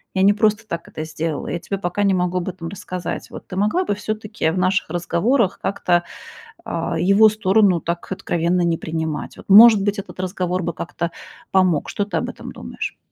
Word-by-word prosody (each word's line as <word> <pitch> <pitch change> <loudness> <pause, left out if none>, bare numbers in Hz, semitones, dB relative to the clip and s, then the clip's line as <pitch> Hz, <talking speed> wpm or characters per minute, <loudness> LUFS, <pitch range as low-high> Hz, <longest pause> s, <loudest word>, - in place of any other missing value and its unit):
Я 190 - +3
не 205 - +6
просто 215 +1 +1
так 170 -4 -5
это 155 - -6
сделала, 160 -1 -4
я 175 - -3
тебе 195 - -4
пока 190 +2 -2
не 200 -1 +3
могу 180 0 0
об 180 - -4
этом 180 -2 -7
рассказать. 185 -1 -5
Вот - - -10
ты - - -7
могла 210 - +1
бы - - 0
всё-таки 215 -4 -2
в 175 - -2
наших 185 0 +1
разговорах 185 - +1
как-то, 175 -3 +1 0.6
а, 165 0 -2
его 200 +5 +6
сторону 200 -3 +3
так 170 +3 -4
откровенно 175 0 0
не 170 -1 +1
принимать?" 160 -1 -4
Вот, - - -14
может 215 +1 +9
быть, 205 0 -1
этот 195 - -12
разговор 185 -1 -2
бы 170 - -1
как-то 170 0 -4 0.4
помог, 185 -5 +2
что 205 - -1
ты 205 - -4
об - - -1
этом - - -9
думаешь? - - -6
185 Hz, 195 wpm, -21 LUFS, 170-205 Hz, 0.6 s, может